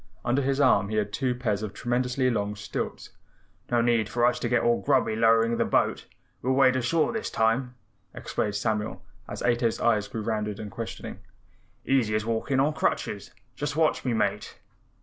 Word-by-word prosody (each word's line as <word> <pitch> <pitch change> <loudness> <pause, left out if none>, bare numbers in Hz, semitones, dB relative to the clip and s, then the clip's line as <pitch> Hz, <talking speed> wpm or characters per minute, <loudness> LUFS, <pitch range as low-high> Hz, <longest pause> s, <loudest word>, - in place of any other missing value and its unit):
Under 125 +4 +2
his 135 +1 0
arm 130 -7 +4
he 110 - -3
had 105 -1 -1
two 130 -2 0
pairs 110 -5 -1
of 105 -2 -5
tremendously 125 +2 0
long 105 -2 -2
stilts. - - -5 0.6
"No 120 -1 +2
need 115 -2 +2
for 120 +1 +1
us 125 - +2
to 120 - -2
get 120 0 +2
all 120 0 +2
grubby 130 -6 +2
lowering 115 +1 +3
the - - +2
boat. - - 0 0.3
We'll 130 +2 +1
wade 130 -1 +4
ashore 130 - +1
this 225 - -3
time," 125 +3 0 0.4
explained 105 -1 -3
Samuel 105 0 -2 0.2
as - - -6
Ato's 120 -1 +1
eyes 110 -3 +2
grew 110 - -5
round 110 -1 -1
and 105 0 -6
questioning. 115 +1 -7 0.7
"Easy 120 -6 +2
as 110 0 -1
walking 115 +4 0
on 145 +3 +2
crutches; - - -2 0.3
just 145 0 -3
watch 160 -1 +2
me, 125 - 0
Mate." 110 - -1
120 Hz, 180 wpm, -26 LUFS, 110-130 Hz, 0.7 s, arm